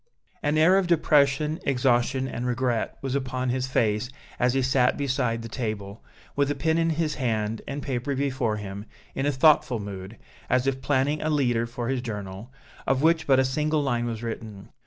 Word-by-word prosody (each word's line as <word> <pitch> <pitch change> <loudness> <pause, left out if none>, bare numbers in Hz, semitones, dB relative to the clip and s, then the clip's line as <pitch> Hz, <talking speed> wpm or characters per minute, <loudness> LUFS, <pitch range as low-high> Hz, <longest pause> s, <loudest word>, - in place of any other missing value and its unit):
An 150 +1 +1
air 180 +5 +5
of 190 - -1
depression, 150 -2 +3
exhaustion 130 0 +1
and 125 -1 -4
regret 120 -2 -1
was 135 -1 -2
upon 130 -2 -2
his 130 +1 -1
face 110 -2 0 0.3
as 125 +1 +2
he 135 - +2
sat 130 -1 +2
beside 125 -5 -1
the - - -5
table, 110 -3 -5 0.3
with 140 0 +2
a 145 - 0
pen 160 +3 +1
in 165 0 +2
his 160 -1 0
hand 110 -2 -1
and 140 +1 -4
paper 135 +1 -2
before 130 -5 -1
him, 100 0 -7 0.3
in 135 - -1
a - - +3
thoughtful 130 -3 +4
mood, 100 +1 -7 0.3
as 125 0 +2
if 135 -1 -1
planning 145 +2 +1
a 155 - -1
leader 120 -6 +1
for 120 0 -5
his 130 -1 -1
journal, 105 -1 -6 0.4
of 135 +1 +1
which 160 0 +3
but 135 -2 +5
a 130 - +4
single 150 +3 0
line 120 -3 0
was 115 -1 -4
written. 110 -3 -6
130 Hz, 190 wpm, -26 LUFS, 115-140 Hz, 0.4 s, air